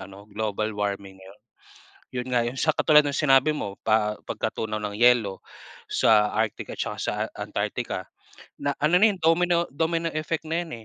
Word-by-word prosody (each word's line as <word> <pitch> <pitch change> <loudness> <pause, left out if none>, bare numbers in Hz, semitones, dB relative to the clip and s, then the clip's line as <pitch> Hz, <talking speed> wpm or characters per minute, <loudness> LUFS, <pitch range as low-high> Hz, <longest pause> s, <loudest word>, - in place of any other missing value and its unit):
ano, 100 +1 -11
global 110 0 -2
warming 100 -2 -4
ngayon. 95 +2 -15 0.7
Yun 125 0 -5
nga 120 - +3
yung 125 +3 -5
sa 155 - +2
katulad 150 0 +5
ng 145 - -1
sinabi 135 0 +4
mo 100 -9 -5
pa 105 -1 +2
pagkatunaw 110 -1 -3
ng 105 -1 -4
yelo, 120 -5 +3 0.4
sa 105 -2 +3
Arctic 110 -1 -2
at - - -12
saka - - -4
sa - - -2 0.3
Antarctica. - - -4 0.5
Na 140 0 -2
ano 155 +5 +3
na 220 - +9
yun 195 - -5
domino 170 +1 +3
domino 165 +2 0
effect 155 +1 -2
na 165 +2 -1
yun 170 - -10
120 Hz, 170 wpm, -25 LUFS, 105-155 Hz, 0.7 s, na